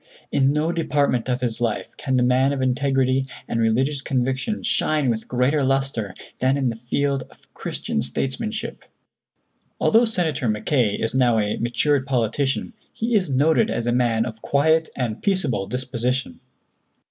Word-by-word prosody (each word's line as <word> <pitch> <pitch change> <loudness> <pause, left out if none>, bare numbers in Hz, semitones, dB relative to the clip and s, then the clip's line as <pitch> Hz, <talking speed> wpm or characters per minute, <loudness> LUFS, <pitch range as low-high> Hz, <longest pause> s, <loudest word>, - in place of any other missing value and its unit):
In 135 0 +3
no 150 +3 +1
department 145 -7 0
of 125 0 0
his 120 -2 -2
life 115 -3 -2
can 130 -2 -1
the 125 - +3
man 130 +3 +3
of 140 - -3
integrity 130 0 +1 0.2
and 115 - -1
religious 130 +6 +1
conviction 135 - -1
shine 150 -5 +1
with 110 -1 -4
greater 130 +4 +1
lustre 135 -6 -1 0.2
than 130 +2 +2
in 135 -3 +1
the 115 - -4
field 135 +4 -1
of - - -23
Christian 70 - -3
statesmanship." 215 - -3 1.0
Although 230 +2 +4
Senator 165 - -1
Mackay 110 0 +1
is 115 0 +1
now 125 -3 +3
a 105 -1 0
matured 130 +4 +1
politician, 130 +2 0 0.2
he 230 +2 -2
is 190 -6 +2
noted 155 - +3
as 115 - -2
a 120 - +1
man 120 -2 +2
of 110 -2 -7
quiet 160 +3 +2
and 115 -4 -3
peaceable 145 - 0
disposition. 125 0 -2
130 Hz, 155 wpm, -23 LUFS, 120-145 Hz, 1.0 s, Although